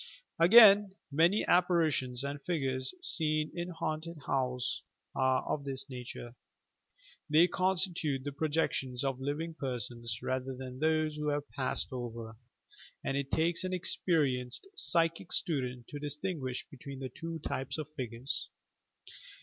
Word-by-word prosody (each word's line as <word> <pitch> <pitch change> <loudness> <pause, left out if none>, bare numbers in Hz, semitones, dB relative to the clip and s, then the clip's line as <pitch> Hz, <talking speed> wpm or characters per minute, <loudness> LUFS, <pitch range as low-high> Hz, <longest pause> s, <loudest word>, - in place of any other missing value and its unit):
Again, 200 +1 +8 0.2
many 170 +8 +3
apparitions 160 -8 +2
and 140 0 -4
figures 135 -6 -1
seen 155 -1 +2
in 175 0 -4
haunted 165 0 -4
houses 125 -2 -1 0.3
are 130 0 +2
of 145 - -2
this 135 -1 -2
nature. 120 -1 -7 1.0
They 155 +3 +6
constitute 180 -7 0
the 145 - -3
projec 155 +3 0
tions 125 -1 -2
of 135 -2 -1
living 145 +5 -3
persons 120 -4 -3
rather 130 0 -2
than 130 0 -8
those 155 0 +1
who 150 0 -2
have 145 0 -1
passed 130 -2 -2
over, 115 -2 -6 0.7
and 135 - -1
it 140 -1 -2
takes 165 +4 +2
au 185 - -2
experienced 150 - +1
psychic 165 - +1
student 125 -8 0
to 145 - -6
dis 145 0 -2
tinguish 150 -8 -3
between 140 0 -9
the 130 -1 -5
two 165 +3 -6
types 135 -2 -3
of 155 -2 -4
figures. 125 -1 -2
145 Hz, 135 wpm, -32 LUFS, 130-165 Hz, 1.0 s, Again